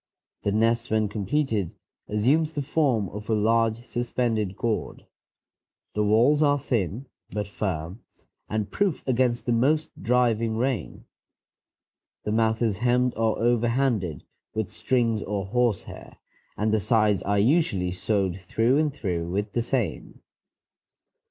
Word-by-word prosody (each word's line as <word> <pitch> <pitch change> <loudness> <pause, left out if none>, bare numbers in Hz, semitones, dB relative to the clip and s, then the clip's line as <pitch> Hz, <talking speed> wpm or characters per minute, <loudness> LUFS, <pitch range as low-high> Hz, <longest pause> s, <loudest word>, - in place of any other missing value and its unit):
The 100 - 0
nest 115 +3 +1
when 110 -1 +1
completed 110 - -1 0.3
assumes 140 +10 +2
the 145 - -2
form 130 -8 +1
of 105 +2 -8
a 110 - +3
large, 115 +1 +2
suspended 120 -5 -1
gourd. 115 -2 -2 0.9
The 105 - +1
walls 115 +8 +4
are 145 -1 +4
thin 120 - -2 0.2
but 105 -1 -3
firm, 95 -2 -4 0.5
and 105 -1 -2
proof 195 -9 -1
against 125 -1 +1
the 120 - 0
most 145 +7 +2
driving 115 -2 +2
rain. 125 -6 -2 1.2
The 105 - -2
mouth 110 +1 +1
is 105 -4 +1
hemmed 125 +1 +2
or 110 0 +1
over 120 0 +2
handed 115 - 0 0.3
with 110 -2 -2
strings 115 -4 0
or 100 -2 -3
horsehair, 120 0 -2 0.4
and 105 +1 +1
the 110 - +3
sides 105 -1 +2
are 100 +1 0
usually 100 - +2
sewed 95 0 -1
through 115 +9 +2
and 155 -1 +1
through 90 -11 -3
with 100 +3 -2
the 120 - 0
same. 120 - -3
115 Hz, 135 wpm, -25 LUFS, 105-125 Hz, 1.2 s, walls